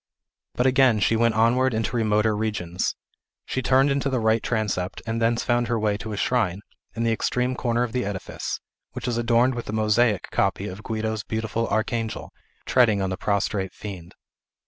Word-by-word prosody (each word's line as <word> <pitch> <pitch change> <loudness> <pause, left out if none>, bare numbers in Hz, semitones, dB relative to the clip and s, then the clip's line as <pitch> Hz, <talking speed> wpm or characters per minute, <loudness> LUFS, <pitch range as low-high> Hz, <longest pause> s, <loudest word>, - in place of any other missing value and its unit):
But 125 - +1
again 130 -4 +4
she 115 - +2
went 115 0 +2
onward 120 +3 +3
into 115 +1 -1
remoter 110 -1 +2
regions. 100 -5 -2 0.5
She 130 - -2
turned 135 +2 +3
into 140 0 0
the 130 -2 0
right 110 0 +2
transept, 105 -5 -2
and 115 0 -2
thence 115 +1 +2
found 120 -1 +1
her 120 -1 0
way 105 -1 +1
to 110 +1 -7
a 105 - -4
shrine, 100 -6 0 0.3
in 115 - -1
the 115 - +2
extreme 125 +3 0
corner 120 -1 0
of 120 - -3
the 125 +1 -1
edifice, 100 -2 -4 0.3
which - - -5
is 120 -1 0
adorned 120 +2 +3
with 120 -3 -6
a - - -3
mosaic 110 -1 +2
copy - - 0
of 95 +3 -7
Guido's 110 -1 -3
beautiful 110 +1 -2
Archangel, 110 0 -2 0.3
treading 115 -5 +4
on 95 -1 -1
the - - -1
prostrate 100 -1 -1
fiend. 90 -5 -8
110 Hz, 185 wpm, -24 LUFS, 105-120 Hz, 0.5 s, again